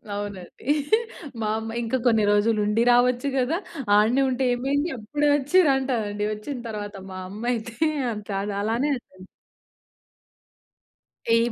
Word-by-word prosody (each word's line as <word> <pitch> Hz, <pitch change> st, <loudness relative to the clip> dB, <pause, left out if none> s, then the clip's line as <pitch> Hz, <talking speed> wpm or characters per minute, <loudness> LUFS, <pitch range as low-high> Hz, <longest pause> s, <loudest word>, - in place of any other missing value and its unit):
అవునండి. 205 Hz, -2 st, -7 dB, 0.8 s
మా 215 Hz, -, 0 dB
అమ్మ 225 Hz, 0 st, -5 dB
"ఇంక 230 Hz, +2 st, -1 dB
కొన్ని 225 Hz, -2 st, +4 dB
రోజులుండి 210 Hz, +1 st, +2 dB
రావచ్చు 245 Hz, +2 st, +3 dB
గదా! 265 Hz, +6 st, +1 dB, 0.4 s
ఆడనే 230 Hz, +6 st, +4 dB
ఉంటే 260 Hz, +1 st, -1 dB
ఏమైంది. 280 Hz, +6 st, 0 dB
అప్పుడే 290 Hz, +7 st, 0 dB
వచ్చిరంటా" 275 Hz, -4 st, +3 dB
అండి 205 Hz, 0 st, -2 dB
ఓచ్చిన 215 Hz, +6 st, -5 dB
తర్వాత 205 Hz, -1 st, -5 dB, 0.2 s
మా 185 Hz, -, -6 dB
అమ్మయితే. 230 Hz, +2 st, -3 dB, 0.4 s
అంతే 210 Hz, -1 st, -6 dB
అది 205 Hz, 0 st, -3 dB
అలానే 230 Hz, +7 st, 0 dB
అంటాది. 185 Hz, -6 st, -12 dB, 2.1 s
ఏం 230 Hz, +1 st, +3 dB
230 Hz, 120 wpm, -24 LUFS, 210-260 Hz, 2.1 s, కొన్ని